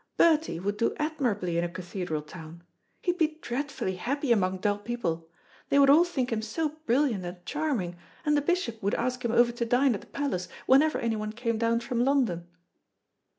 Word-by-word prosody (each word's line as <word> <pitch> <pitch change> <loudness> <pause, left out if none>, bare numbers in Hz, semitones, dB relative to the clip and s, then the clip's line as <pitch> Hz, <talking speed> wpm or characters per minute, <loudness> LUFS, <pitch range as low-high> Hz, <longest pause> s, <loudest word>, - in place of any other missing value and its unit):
Bertie 315 - +3
would 205 +3 -2
do 230 - +1
admirably 235 - -1
in - - +1
a 175 - -1
cathedral 175 -3 -4
town. 165 +1 -11 0.4
He'd 355 0 0
be 310 -1 +1
dreadfully 260 -8 -3
happy 275 +6 -1
among 190 -4 +2
dull 205 +2 0
people. 185 -8 -3 0.4
They 280 - +3
would 275 -1 +7
all 325 +4 +7
think 265 -8 -2
him 220 -1 0
so 300 +9 -1 0.2
brilliant 240 -5 +2
and 175 0 -8
charming, 255 - -2 0.3
and 295 0 +3
the 290 - +3
bishop 285 -8 -1
would 200 +1 0
ask 250 +1 -2
him 235 - 0
over 240 0 +4
to 240 0 -3
dine 245 +3 +3
at 200 - -4
the - - -16
palace 265 -11 -2 0.2
whenever 295 +4 +5
anyone 215 -2 -2
came 230 -1 -2
down 230 0 +2
from 240 0 0
London." 245 -11 +1
235 Hz, 190 wpm, -28 LUFS, 185-280 Hz, 0.4 s, would